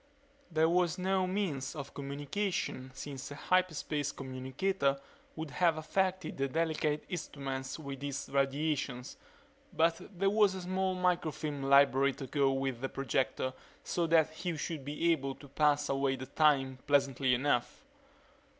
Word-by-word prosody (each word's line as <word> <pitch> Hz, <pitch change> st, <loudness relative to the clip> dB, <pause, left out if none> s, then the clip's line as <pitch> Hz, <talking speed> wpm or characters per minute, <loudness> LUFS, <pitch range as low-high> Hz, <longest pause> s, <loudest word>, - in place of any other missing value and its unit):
There 160 Hz, -1 st, +3 dB
was 175 Hz, +1 st, +2 dB
no 185 Hz, 0 st, +1 dB
means 180 Hz, -10 st, -2 dB
of 140 Hz, -2 st, -7 dB
communication 140 Hz, 0 st, -3 dB
since 135 Hz, -2 st, -6 dB
a 145 Hz, -, -7 dB
hyperspace 155 Hz, -5 st, 0 dB
communicator 135 Hz, +3 st, -1 dB, 0.4 s
would 160 Hz, -2 st, -5 dB
have 170 Hz, -3 st, +2 dB
affected 185 Hz, +3 st, -1 dB
the 135 Hz, 0 st, +1 dB
delicate 155 Hz, 0 st, 0 dB
instruments 135 Hz, -7 st, -4 dB
with 140 Hz, -3 st, -7 dB
its 140 Hz, -1 st, -3 dB
radiations 140 Hz, -2 st, -1 dB, 0.6 s
but 165 Hz, +1 st, +3 dB, 0.2 s
there 195 Hz, +2 st, +2 dB
was 205 Hz, -2 st, +4 dB
a 190 Hz, -, -5 dB
small 185 Hz, +1 st, 0 dB
microfilm 165 Hz, -5 st, 0 dB
library 140 Hz, 0 st, +5 dB
to 135 Hz, -, -7 dB
go 135 Hz, +1 st, +2 dB
with 135 Hz, -2 st, -2 dB
the 135 Hz, -, -2 dB
projector 130 Hz, -1 st, -1 dB, 0.3 s
so 170 Hz, -1 st, 0 dB
that 160 Hz, -1 st, +4 dB
he 170 Hz, +1 st, -4 dB
should 150 Hz, -1 st, -4 dB
be 150 Hz, +4 st, +1 dB
able 135 Hz, -4 st, -1 dB
to 140 Hz, -, -13 dB
pass 145 Hz, +1 st, +2 dB
away 135 Hz, -1 st, +1 dB
the 130 Hz, 0 st, -6 dB
time 135 Hz, -2 st, +2 dB
pleasantly 135 Hz, -2 st, +3 dB
enough. 125 Hz, -1 st, 0 dB
145 Hz, 140 wpm, -32 LUFS, 135-170 Hz, 0.6 s, library